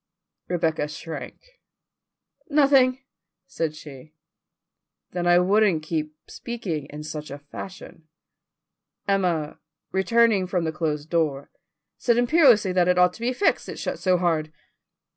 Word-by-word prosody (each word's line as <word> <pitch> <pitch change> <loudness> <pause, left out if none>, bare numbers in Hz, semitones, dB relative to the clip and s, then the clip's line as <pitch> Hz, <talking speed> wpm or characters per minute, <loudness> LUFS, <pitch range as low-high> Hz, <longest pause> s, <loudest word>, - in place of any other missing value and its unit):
Rebecca 160 -4 0
shrank. 155 +2 -8 1.1
"Nothing," 270 -3 +4 0.4
said 160 -3 -3
she. 150 0 -12 1.0
"Then 175 -1 -2
I 175 0 +6
wouldn't 190 -2 +3
keep 155 -1 -3
speaking 190 - -5
in 150 +1 -8
such 150 0 -6
a 140 - -7
fashion." 155 +2 -11 1.0
Emma, 180 -6 0 0.3
returning 210 0 +3
from 180 -1 -1
the 160 - -1
closed 155 -1 -3
door, 150 -5 -1 0.5
said 235 -1 +2
imperiously 245 - +4
that 180 -1 +2
it 180 0 +3
ought 180 0 +4
to 225 - -14
be 240 +2 0
fixed, 325 +11 0
it - - -6
shut - - -4
so 185 -1 +2
hard. 160 -3 0
175 Hz, 125 wpm, -24 LUFS, 155-210 Hz, 1.1 s, I